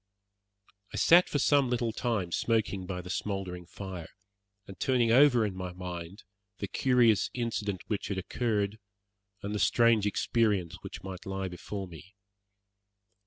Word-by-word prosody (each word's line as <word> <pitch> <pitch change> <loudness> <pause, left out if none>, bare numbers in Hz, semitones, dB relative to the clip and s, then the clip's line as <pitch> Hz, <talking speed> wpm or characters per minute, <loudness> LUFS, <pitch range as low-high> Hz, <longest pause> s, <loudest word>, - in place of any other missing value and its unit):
I - - -3
sat 175 +2 +6
for - - 0
some 140 -1 +3
little 120 -2 0
time 110 -6 -2
smoking 105 -3 0
by 90 -1 -4
the 90 - -9
smouldering 95 -3 -4
fire, 95 -4 -7 0.6
and 95 - -12
turning 125 -3 +2
over 125 -2 +6
in 100 - -3
my 90 -1 -5
mind 90 +1 -7 0.3
the 100 - -4
curious 120 -3 +3
incident 105 -6 -2
which 105 - -3
had 100 -1 -3
occurred, 105 +1 -1 0.6
and 100 +1 -3
the 105 - -1
strange 115 -3 +4
experience 100 -5 +1
which 95 - -8
might 95 -1 -8
lie 95 -1 -3
before 95 +2 -6
me. 90 +4 -13
100 Hz, 145 wpm, -30 LUFS, 95-115 Hz, 0.6 s, sat